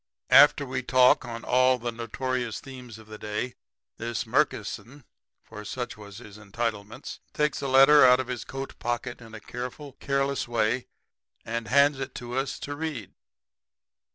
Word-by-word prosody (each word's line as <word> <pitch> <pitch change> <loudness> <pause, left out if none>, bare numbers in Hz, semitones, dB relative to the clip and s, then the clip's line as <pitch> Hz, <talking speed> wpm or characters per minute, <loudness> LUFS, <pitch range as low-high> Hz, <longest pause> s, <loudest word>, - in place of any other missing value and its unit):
"] - - -45 0.2
"After - - -5
we - - -3
talk 130 0 +4
on 115 -1 -7
all 130 +1 +3
the 120 0 -4
notorious 120 +1 -3
themes 125 -4 -11
of 110 - -14
the 110 0 -11
day, 105 +4 -4 0.4
this 115 0 -3
Murkison 135 +4 -1 0.4
for 105 -1 -10
such 120 +3 -5
was 100 -2 -12
his 105 -3 -12
entitlements 110 +2 -5
takes 150 -1 0
a 140 - -2
letter 135 +2 +7
out 125 0 +7
of 130 - -1
his 125 -1 -5
coat 135 0 -7
pocket 120 +1 -3
in 115 -1 -11
a - - -8
careful, 125 +6 -7
careless 140 -1 -1
way 120 +1 0 0.6
and 115 0 -4
hands 140 +2 +4
it 135 - -5
to 120 0 -6
us 135 0 -2
to 145 - -5
read. 145 - -5
125 Hz, 165 wpm, -27 LUFS, 115-135 Hz, 0.6 s, letter